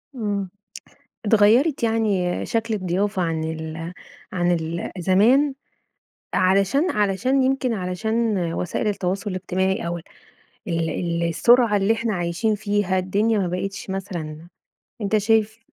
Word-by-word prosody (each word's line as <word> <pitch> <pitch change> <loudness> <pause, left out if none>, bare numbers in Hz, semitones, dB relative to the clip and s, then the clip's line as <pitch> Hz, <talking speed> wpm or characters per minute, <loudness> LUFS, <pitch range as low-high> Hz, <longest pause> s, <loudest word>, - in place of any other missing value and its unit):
إمم. 205 -4 -2 0.8
اتغيّرت 225 +8 +4
يعني 210 -6 0
شكل 225 0 -1
الضيافة 190 0 -1
عن 160 -1 -1
ال 160 +1 -5 0.4
عن 175 -2 +1
ال 165 0 -2
زمان 235 - +4 0.8
علشان 195 - +3
علشان 210 +7 +1
يمكن 260 -2 +1
علشان 220 +4 -1 0.2
وسائل 180 +5 -2
التواصل 195 0 -2
الاجتماعي 185 0 -1
أو 175 0 -2
ال 165 - -10 0.7
ال 170 0 -1
السرعة 235 +5 +4
اللي 200 +3 +3
إحنا 225 -1 -2
عايشين 175 +5 0
فيها، 205 -3 0
الدنيا 205 +4 +1
ما 185 -3 0
بقتش 195 +2 -4
مثلًا 170 -4 -5 0.5
أنت 210 +1 +1
شايف 220 +1 +1
195 Hz, 120 wpm, -23 LUFS, 180-220 Hz, 0.8 s, اتغيّرت